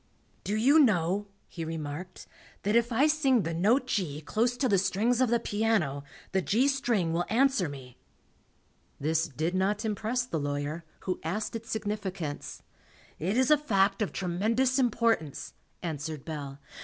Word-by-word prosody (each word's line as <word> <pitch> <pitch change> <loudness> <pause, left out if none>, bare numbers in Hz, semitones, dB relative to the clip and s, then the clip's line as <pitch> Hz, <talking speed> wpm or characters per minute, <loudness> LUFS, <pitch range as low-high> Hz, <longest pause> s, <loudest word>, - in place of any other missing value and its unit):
"Do 205 - -1
you 270 +8 +5
know," 200 - +3 0.2
he 165 - -6
remarked, 160 +2 -6 0.4
"that 210 +2 +1
if 235 +1 +3
I 250 +5 +4
sing 280 -7 +3
the 165 - -2
note 215 +11 +3
G 180 - -2
close 235 +9 0
to 265 - +1
the 200 -5 +3
strings 225 +6 +1
of 255 - +3
the 235 0 +3
piano, 205 -11 0 0.3
the 190 - +1
G 235 +9 +2
string 235 -11 +1
will 175 +1 0
answer 240 - +2
me?" 130 -3 -11 1.0
This 160 +3 +1
did 155 +4 -2
not 200 +4 0
impress 220 +4 -1
the 165 -10 -3
lawyer, 145 +3 -3 0.2
who 185 - -2
asked 205 +8 -2
its 230 0 -6
significance. 200 -8 -4 0.6
"It 190 +8 0
is 260 +2 +3
a 300 - +6
fact 200 -7 +2
of 210 - 0
tremendous 225 +9 +1
importance," 230 - 0 0.3
answered 155 -3 -4
Bell. 145 -4 -6
200 Hz, 155 wpm, -29 LUFS, 165-235 Hz, 1.0 s, a